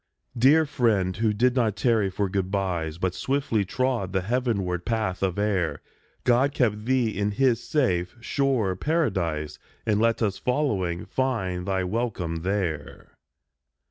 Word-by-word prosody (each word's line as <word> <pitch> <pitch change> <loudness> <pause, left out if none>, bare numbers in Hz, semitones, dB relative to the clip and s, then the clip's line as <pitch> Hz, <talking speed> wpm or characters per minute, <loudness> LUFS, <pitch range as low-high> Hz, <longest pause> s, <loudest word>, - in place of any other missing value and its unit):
Dear 140 +7 +5
friend, 110 -10 +1
who 110 0 +2
did 125 +4 +2
not 115 -5 +1
tarry 110 -1 +2
for 100 +2 -1
good 95 -1 -2
byes 90 -5 -2
But 90 0 -1
swiftly 135 -5 0
trod 120 -2 -1
the 95 - +1
heavenward 100 -6 -1
path 110 -5 -1
of 95 -2 0
air, 100 -5 0 0.4
God 130 +3 +3
keep 105 -4 +1
thee 125 -2 +2
in 105 0 0
His 120 0 +2
safe, 90 - 0
sure 120 -6 0
Paradise, 95 - -1 0.3
And 105 -2 +2
let 115 0 +2
us, 100 -3 -1
following, 105 - -1
find 95 -9 -2
thy 95 -1 0
welcome 90 -5 -2
there. 85 -4 -3
105 Hz, 140 wpm, -25 LUFS, 95-125 Hz, 0.4 s, Dear